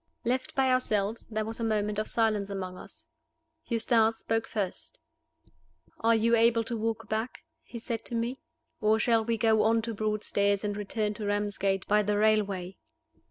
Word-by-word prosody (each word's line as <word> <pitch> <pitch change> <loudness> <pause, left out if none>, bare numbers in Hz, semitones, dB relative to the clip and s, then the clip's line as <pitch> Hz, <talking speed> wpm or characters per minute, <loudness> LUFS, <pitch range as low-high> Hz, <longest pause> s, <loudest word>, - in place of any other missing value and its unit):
LEFT 255 +2 -1
by 265 -1 +3
ourselves, 220 -4 0
there 215 -1 -2
was 225 +1 -5
a - - -2
moment 210 -1 0
of 215 - -2
silence 215 -3 +1
among 185 -2 -5
us. - - -12 0.6
Eustace 225 -1 +2
spoke 225 0 -1
first. 210 - -4 1.0
"Are 230 0 +3
you 230 +1 +3
able 230 0 +4
to 235 +1 -2
walk 225 0 -2
back?" 220 +3 -3 0.2
he 240 - -10
said 230 0 -4
to 240 - -5
me. 235 +3 -2 0.4
"Or 215 +1 +3
shall 225 0 +2
we 230 +1 -1
go 220 -1 +3
on 225 +1 +3
to 230 0 -3
Broadstairs, 205 -1 0
and 205 -1 -2
return 210 +1 -2
to 210 0 -6
Ramsgate 200 -2 -1
by 210 +1 +4
the 205 0 0
railway?" 200 -4 +1
220 Hz, 170 wpm, -29 LUFS, 205-230 Hz, 1.0 s, able